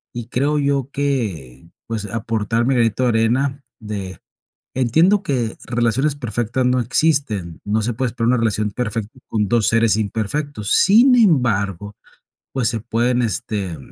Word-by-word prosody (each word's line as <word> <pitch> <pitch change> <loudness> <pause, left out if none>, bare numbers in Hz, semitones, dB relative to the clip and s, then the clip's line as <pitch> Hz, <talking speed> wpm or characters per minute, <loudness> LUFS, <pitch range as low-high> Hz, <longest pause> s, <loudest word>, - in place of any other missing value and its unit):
y 120 -1 -5
creo 140 +5 0
yo 140 -2 0
que, 100 - -3 0.2
pues, 110 -2 -3
aportar 115 +2 -1
mi 135 - +2
granito 115 +1 +1
de 125 - +3
arena 125 +5 +1 0.2
de 100 -4 -6 0.6
Entiendo 160 - +3
que 120 - -2
relaciones 120 +5 0
perfectas 120 0 -1
no 125 0 +2
existen, 120 - 0
no 105 +2 0
se 120 +2 -2
puede 125 +3 -1
esperar 115 -1 -1
una 125 - +3
relación 110 -2 0
perfecta 115 +1 -4
con 105 -2 -1
2 115 -2 +2
seres 115 -2 +3
imperfectos, 110 +2 -3
sin 240 +6 +6
embargo, 105 - +1 0.6
pues, 125 -4 0
se 115 -1 -2
pueden, 120 +3 0
este, 100 -5 -2
115 Hz, 145 wpm, -20 LUFS, 105-130 Hz, 0.6 s, sin